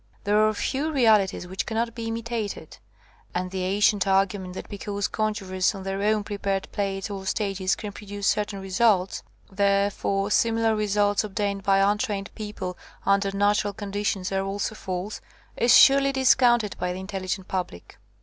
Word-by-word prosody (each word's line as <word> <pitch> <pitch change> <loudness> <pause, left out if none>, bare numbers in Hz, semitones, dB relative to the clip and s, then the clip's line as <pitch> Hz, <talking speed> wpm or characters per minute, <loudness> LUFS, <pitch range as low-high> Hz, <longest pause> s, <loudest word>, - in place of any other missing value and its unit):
There 210 +1 +3
are - - +2
few 280 +8 -1
real 245 -7 +5
ities 190 -2 -4
which 190 +2 -4
cannot 230 0 -1
be 230 -1 -5
imitated, 230 -2 -4 0.6
and 180 0 -2
the 190 -1 -3
an 190 +2 -1
cient 205 -2 +3
argument 190 -1 +1
that - - -7
because 205 0 -3
conjurers 200 -3 -1
on 195 - -7
their 195 +1 -3
own 210 0 +2
prepared 200 -2 -2
plates 195 0 -3
or 195 -1 -5
stages 195 -2 0
can 210 -2 -6
pro 205 +1 -12
duce 205 0 -5
certain 205 -1 0
results, 195 -1 +1 0.3
therefore 200 0 +1
similar 225 0 +2
re 215 0 -1
vi - - -4
PREFACE 205 -1 +2
suits - - +4
obtained 200 -1 -2
by 195 0 +3
untrained 200 0 0
people 210 -4 -6 0.3
under 200 0 +3
natural 205 0 +2
conditions 200 -2 -3
are 195 0 0
also 200 +2 -3
false, 190 0 -5 0.3
is 235 +1 +3
surely 275 0 +6
discounted 245 -5 +3
by 180 0 -1
the 185 - -6
intelligent 190 -1 -4
public. 180 - -5
200 Hz, 170 wpm, -25 LUFS, 195-215 Hz, 0.6 s, surely